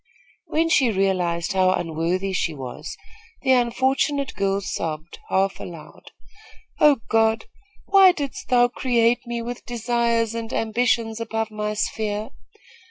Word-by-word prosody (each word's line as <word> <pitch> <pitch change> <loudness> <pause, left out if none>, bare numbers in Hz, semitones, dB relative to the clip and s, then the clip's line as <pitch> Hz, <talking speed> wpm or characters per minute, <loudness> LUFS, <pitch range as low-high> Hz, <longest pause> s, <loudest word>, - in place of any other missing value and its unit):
When 325 +2 +1
she 270 -7 +3
realized 185 -4 0
how 185 -1 +3
unworthy 175 +4 -1
she 165 -3 -1
was, 130 -3 -7 0.5
the 265 - +3
unfortunate 260 +3 +1
girl 195 +1 0
sobbed, 160 -4 -5
half 195 +1 +1
aloud: 170 -3 -10 0.7
"Oh, 290 -5 +5
God, 225 0 +2 0.4
why 390 -2 +7
didst 285 -6 -5
thou 245 -1 +5
create 240 -1 +1
me 235 -1 -3
with 245 +1 -6
desires 235 -1 0
and 230 0 -5
ambitions 225 0 0
above 225 -1 -3
my 210 0 -3
sphere? 210 0 -2
225 Hz, 125 wpm, -23 LUFS, 195-245 Hz, 0.7 s, why